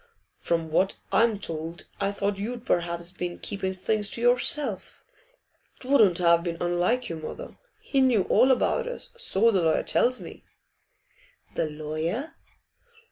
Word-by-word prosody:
'From 165 -2 -1
what 190 +4 +1
I'm 225 -2 +3
told 165 -3 -5
I 195 0 0
thought 200 0 -2
you'd 235 +3 -5
perhaps 170 0 -1
been 180 -1 -5
keeping 190 -1 -4
things 210 +2 0
to 230 - -4
yourself. 245 +4 +1 0.8
'Twouldn't 230 -10 +4
have 170 -1 +4
been 170 -1 -3
unlike 175 +8 0
you, 165 - -5
mother. 155 - -8 0.2
He 275 - +1
knew 245 -7 +4
all 260 - +4
about 470 - +2
us, - - -6
so 230 - +2
the 190 -4 +2
lawyer 160 -1 +2
tells 250 +1 +1
me.' - - -11 1.1
'The 155 - -1
lawyer? 155 - -4
195 Hz, 140 wpm, -26 LUFS, 170-245 Hz, 1.1 s, Twouldn't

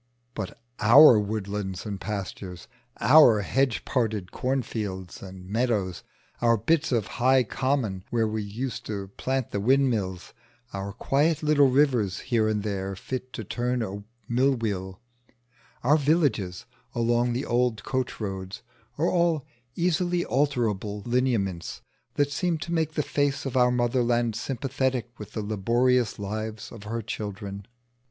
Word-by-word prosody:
But - - -6 0.2
our 120 +2 +8
woodlands 100 -2 -3
and 100 -3 -5
pastures, 95 -3 -5 0.3
our 120 -3 +7
hedge 130 +4 0
parted 110 -7 -1
corn 130 0 -1
fields 95 -6 -5
and 95 -1 -10
meadows, 105 -4 0 0.4
our 115 -1 +4
bits 160 +8 +1
of 115 -5 +1 0.2
high 130 +1 +5
common 120 -7 -1
where 115 -2 +1
we 110 0 -2
used 115 +5 -5
to 100 -3 -4
plant 130 +4 -2
the 100 - -1
windmills, 110 -6 +1 0.4
our 100 0 -4
quiet 145 +8 +1
little 145 -2 +5
rivers 125 -9 +2
here 115 -4 +1
and 105 -1 0
there 100 -2 -3
fit 130 +5 -5
to 110 - -5
turn 125 +3 -1
a 100 -1 -5 0.2
mill 130 +3 +2
wheel, 95 -5 -3 0.8
our 145 +5 +5
villages 140 - +1 0.3
along 120 +1 +2
the 130 +4 -2
old 120 -2 +1
coach 130 -1 -2
roads, 95 -2 -5 0.3
are 155 - +1
all 170 -5 +2 0.3
easily 175 0 +1
alterable 110 -7 0
lineaments 115 -8 -1 0.3
that 145 0 +1
seem 170 +2 0
to 170 +2 -5
make 160 -2 0
the 150 - +1
face 145 0 0
of 135 - -4
our 125 -1 +5
Motherland 120 -2 +1
sympathetic 130 0 -2
with 105 - -9
the 110 - -3
laborious 120 +4 +1
lives 110 +1 -5
of 110 -3 -10
her 115 +2 -3
children. 100 -2 -6
115 Hz, 140 wpm, -26 LUFS, 100-130 Hz, 0.8 s, our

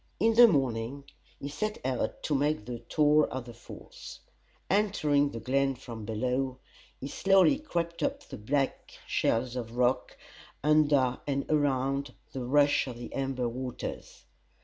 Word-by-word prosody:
In 225 +1 +3
the 240 +1 +9
morning 135 - -1 0.4
he 140 - -5
set 210 +10 -3
out 125 -4 -2
to 150 - -1
make 145 -5 0
the 120 0 -5
tour 150 +2 +3
of 130 -2 -5
the 120 - -10
Falls. 115 - -12 0.5
Entering 155 -9 +2
the 115 - -6
glen 135 +3 +1
from 115 -4 -9
below, 125 +4 -1 0.4
he 135 - -5
slowly 195 - +4
crept 170 - -3
up 280 0 -1
the - - -9
black 135 +5 -2
shelves 120 +2 0
of 120 -1 -5
rock, 125 +1 +1 0.5
under 145 -4 +3
and 140 -1 -1
around 140 -1 0 0.2
the 130 - -4
rush 145 +3 +3
of 120 -2 -6
the 120 - -8
amber 135 -2 -1
waters. 125 +1 -6
135 Hz, 150 wpm, -29 LUFS, 125-150 Hz, 0.5 s, the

